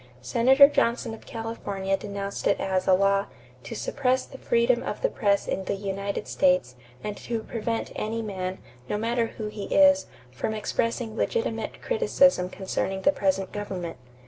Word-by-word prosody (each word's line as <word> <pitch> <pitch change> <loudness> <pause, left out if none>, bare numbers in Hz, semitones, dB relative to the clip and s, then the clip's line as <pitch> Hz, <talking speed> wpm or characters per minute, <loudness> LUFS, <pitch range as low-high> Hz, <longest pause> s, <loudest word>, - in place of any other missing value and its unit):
Senator 260 - +6
Johnson 235 -5 0
of 225 - -12
California 205 -4 -3
denounced 200 0 -4
it - - +2
as 190 -1 0
a 190 - +6
law 195 +1 +2 0.3
"to - - -7
suppress 260 - 0
the - - -12
freedom 475 +1 +2
of - - -5
the - - +3
press 200 -3 +1
in 190 - -2
the - - -1
United 200 +1 -3
States 180 -9 +2 0.3
and 210 -1 -3
to 230 -2 -4
prevent 230 0 -3
any 225 +1 -2
man, 190 -3 -4 0.3
no 210 - 0
matter 230 +2 0
who 220 - -4
he 210 -1 -5
is, 285 0 +5 0.2
from 130 - -3
expressing 225 +1 -1
legitimate 465 - -2
criticism 275 - +3
concerning 190 0 -3
the 285 - +6
present 190 -6 0
government." 185 -5 -5
210 Hz, 160 wpm, -26 LUFS, 195-235 Hz, 0.3 s, Senator